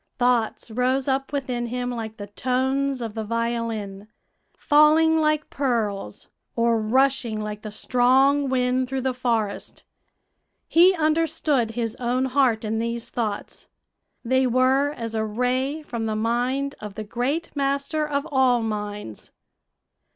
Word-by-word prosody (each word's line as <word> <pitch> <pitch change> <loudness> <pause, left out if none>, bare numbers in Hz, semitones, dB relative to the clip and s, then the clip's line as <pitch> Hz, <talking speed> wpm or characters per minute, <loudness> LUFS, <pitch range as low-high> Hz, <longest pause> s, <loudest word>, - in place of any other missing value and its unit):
Thoughts 245 -2 0
rose 255 +3 0
up 270 0 -1
within 250 -4 -2
him 250 +1 -3
like 225 -2 -6
the 205 - -6
tones 260 +4 -1
of 225 -2 -5
the 220 0 -4
violin, 225 -3 -3 0.5
falling 315 +2 +4
like 305 -1 0
pearls, 215 - -2 0.3
or 230 -1 +2
rushing 250 -1 +1
like 210 0 -5
the 215 - -6
strong 260 +5 +3
wind 255 0 +1
through 265 0 -2
the 260 0 -1
forest. 230 -5 -2 0.8
He 360 +3 +5
understood 310 -6 +1
his 230 -2 -2
own 250 +1 0
heart 255 -4 +2
in 220 +1 -1
these 235 0 -3
thoughts; 215 -4 -4 0.6
they 260 +2 +2
were 260 +3 +3
as 230 -4 -5
a 220 -1 0
ray 255 +7 -1
from 235 -5 -4
the 215 - -1
mind 245 +5 0
of 210 -2 -8
the 215 - -5
Great 265 +11 -3
Master 280 +2 0
of 285 -1 -2
all 255 -3 +3
minds. 210 - -5
250 Hz, 135 wpm, -24 LUFS, 225-275 Hz, 0.8 s, He